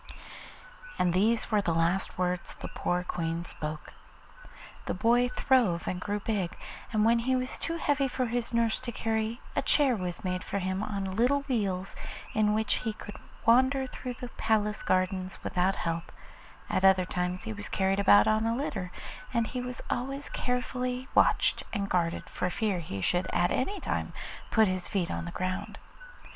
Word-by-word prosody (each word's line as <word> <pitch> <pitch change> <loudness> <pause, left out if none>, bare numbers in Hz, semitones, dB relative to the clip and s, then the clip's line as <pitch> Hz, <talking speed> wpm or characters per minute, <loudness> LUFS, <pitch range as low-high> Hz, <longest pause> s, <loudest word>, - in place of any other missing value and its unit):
And 175 -1 +2
these 220 +6 +2
were 210 -1 +4
the 170 -4 0
last 170 +3 +1
words 180 -1 -1
the - - -7
poor 180 0 -1
Queen 170 -1 -2
spoke. 155 -2 -6 0.9
The - - -1
boy 240 +5 +3
throve 250 -9 +2
and 180 0 -2
grew 205 +2 -1
big, 195 -4 -2 0.3
and 215 -1 +3
when 230 +1 +5
he 260 +3 +1
was 255 0 -2
too 335 0 -2
heavy 285 -3 +2
for 255 0 -1
his 240 0 -2
nurse 230 -1 +2
to 250 -2 -5
carry, 225 +1 -1
a - - +2
chair 275 -4 +3
was 180 -4 -4
made 185 -1 -2
for - - -3
him 190 0 -1
on 200 -2 -2
little 250 +6 +3
wheels, 200 -8 -1 0.4
in 210 -1 +3
which 220 0 +1
he 220 -3 -2
could 210 - -9 0.3
wander 260 +3 +5
through 250 -1 -6
the 245 +1 -7
palace 215 -2 +1
gardens 185 0 0
without 185 +1 +1
help; 165 0 -3 0.6
at 185 - 0
other 190 -1 +6
times 180 0 -2
he 110 - -4
was 100 -1 -6
carried 190 +1 +1
about 105 - +7
on 220 +1 +3
a 230 - +1
litter, 195 -9 -3 0.4
and 235 -2 +2
he 250 +2 -3
was 250 -1 -6
always 275 +3 -3
carefully 250 +1 -2
watched - - +4
and 200 -3 -1
guarded 170 -2 0
for 180 - -2
fear 200 0 0
he 100 - -5
should 180 - +1
at 175 - +2
any 400 +10 0
time - - -2 0.4
put 220 -1 +5
his 185 -1 -1
feet 185 -5 -1
to - - -2
the 170 - -5
ground. 185 +2 -3
210 Hz, 180 wpm, -29 LUFS, 180-245 Hz, 0.9 s, about